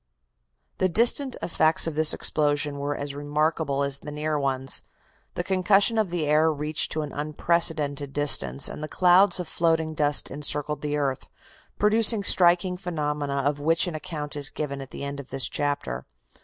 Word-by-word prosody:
The 185 - +1
distant 240 +7 +3
effects 160 -2 +1
of 165 - -3
this 155 +1 +5
explosion 145 -1 0
were 145 +1 -3
as 145 0 -6
remarkable 145 0 -2
as 140 0 -1
the 150 - -9
near 150 0 -3
ones. 135 -1 -2 0.5
The 175 - -3
concussion 195 +4 +2
of 215 -4 0
the 170 -3 -3
air 155 +2 +2
reached 150 +1 -2
to 155 - -3
an 145 - -8
unprecedented 150 -2 +2
distance 70 - +3
and - - -8
the 155 - -5
clouds 185 +4 +3
of 180 - -5
floating 160 -1 -1
dust 150 -1 +2
encircled 150 0 -2
the 150 0 -3
earth, 135 -3 -3 0.5
producing 215 0 +3
striking 180 -1 +3
phenomena 150 -6 -3
of 145 0 -1
which 165 +4 +2
an 175 - -5
account 155 -2 -6
is 145 -1 -3
given 140 -2 -6
at 135 - -10
the - - -9
end 140 0 -6
of 135 - -11
this 135 -1 -1
chapter. 140 - -4
150 Hz, 170 wpm, -24 LUFS, 145-170 Hz, 0.5 s, this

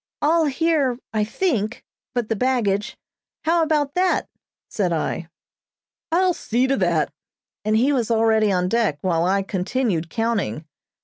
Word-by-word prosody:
"All 320 +2 +3
here, 290 -3 +1 0.2
I 215 -1 +1
think, 225 - -1 0.3
but 240 -3 0
the 225 - 0
baggage. 215 -4 0 0.5
How 335 +1 +3
about 300 -3 +1
that?" 365 0 +1 0.4
said 190 -5 -1
I. 165 0 -2 0.8
"I'll 365 +2 +3
see 250 -6 0
to 270 +1 +1
that," 170 -6 +1 0.5
and 215 +1 +2
he 265 +6 +3
was 240 -5 0
already 220 -2 +3
on 180 -1 +1
deck, 225 -7 +1
while 170 -2 +1
I 195 +2 +2
continued 190 -2 -1
counting. 205 - -1
225 Hz, 140 wpm, -22 LUFS, 195-275 Hz, 0.8 s, All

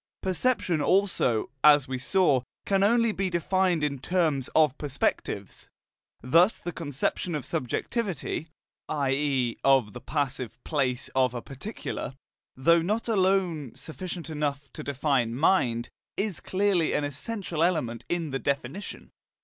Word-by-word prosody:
Perception 190 -3 +1
also, 175 - +2
as 145 -2 +7
we 130 -1 -3
saw, 145 -2 +3 0.2
can 195 -1 +2
only 230 +2 +4
be 195 -2 -1
defined 180 -1 +1
in 140 -2 -1
terms 155 -3 0
of 150 -4 +5
perspectives. 140 -2 -2 0.5
Thus 170 - +4
the 175 - -5
conception 155 +2 -2
of 145 -4 -4
subjectivity, 170 - -2 0.4
i.e. 135 -4 0
of 135 -6 +4
the 125 - -8
"passive" 130 -4 -2
place 135 -4 -1
of 130 -2 +2
a 120 - -3
particular, 135 - -6 0.4
though 170 +6 +4
not 215 +7 -1
alone 185 - +1
sufficient 170 +5 -6
to 145 -3 -4
define 135 -4 0
mind, 125 -6 +2 0.3
is 200 -3 -1
clearly 190 -4 +1
an 150 - +1
essential 165 +4 -3
element 155 -10 +1
in 170 -4 -1
the 135 - -1
definition. 140 +8 -4
150 Hz, 125 wpm, -27 LUFS, 135-185 Hz, 0.5 s, as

